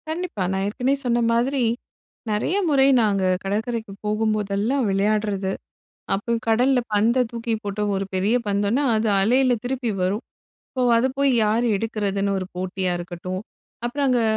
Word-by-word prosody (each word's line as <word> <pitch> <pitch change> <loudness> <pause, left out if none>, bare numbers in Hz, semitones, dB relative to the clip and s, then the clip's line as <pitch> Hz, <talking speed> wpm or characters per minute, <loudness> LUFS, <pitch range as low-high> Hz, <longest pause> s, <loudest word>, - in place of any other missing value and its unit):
கண்டிப்பா. 320 - -3
நான் 190 0 -1
ஏற்கனவே 255 +6 0
சொன்ன 240 -1 +2
மாதிரி, 250 +3 +1 0.7
நெறைய 215 - 0
முறை 275 -2 +4
நாங்க 200 -3 +1 0.2
கடற்கரைக்கு 220 +1 -2
போகும்போதெல்லாம் 215 +3 0
விளையாடுறது. 200 -1 0 0.6
அப்போ 200 +4 -2 0.2
கடல்ல 250 +4 +3
பந்த 230 +5 +3
தூக்கி 230 -1 -3
போட்டு, 205 0 -3
ஒரு 195 0 -1
பெரிய 200 +5 +2
பந்துன்னா 205 +7 +1
அது 220 0 +1
அலையில 250 +4 +3
திருப்பி 250 -2 -1
வரும். 195 +5 0 0.5
ஸோ - - 0 0.2
அதை 240 +3 +3
போய் 280 0 +4
யார் 220 +3 +2
எடுக்கிறதுன்னு 200 -2 -1
ஒரு 185 - -4
போட்டியா 185 0 -2
இருக்கட்டும், 175 +1 -5 0.5
அப்புறம் 275 +4 -1
அங்க 245 -2 +3
215 Hz, 140 wpm, -23 LUFS, 200-245 Hz, 0.7 s, முறை